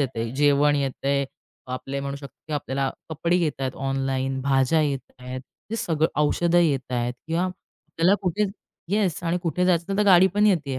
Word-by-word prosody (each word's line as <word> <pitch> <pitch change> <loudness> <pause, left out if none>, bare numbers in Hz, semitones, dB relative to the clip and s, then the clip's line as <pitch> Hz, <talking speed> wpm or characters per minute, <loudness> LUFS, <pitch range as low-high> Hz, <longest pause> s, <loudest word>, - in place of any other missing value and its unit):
येतंय. 115 -4 -2
जेवण 145 +1 +4
येतंय, 140 0 0 0.4
आपले 135 +2 -4
म्हणू 140 0 -4
शकतो 140 +2 -11
आपल्याला 135 -1 -1 0.2
कपडे 170 +3 0
येत 165 -6 -1
आहेत, 130 -1 -2
ऑनलाईन, 135 0 -1
भाज्या 135 +3 +3
येत 140 -3 -3
आहेत, 125 +1 -6 0.3
ते 225 - -1
सगळं 160 -6 +1
औषधं 170 +3 +2
येतायत 130 -6 0
किंवा 165 +2 0
आपल्याला 185 -1 -1
कुठे 185 +3 +1 0.4
येस. 195 -4 0
आणि 170 +1 +1
कुठे 180 +1 0
जायचं 180 +2 +1
तर 210 - +5
गाडी 190 -2 +7
पण 210 +1 +4
येतेय 145 -9 +1
145 Hz, 160 wpm, -24 LUFS, 135-175 Hz, 0.4 s, गाडी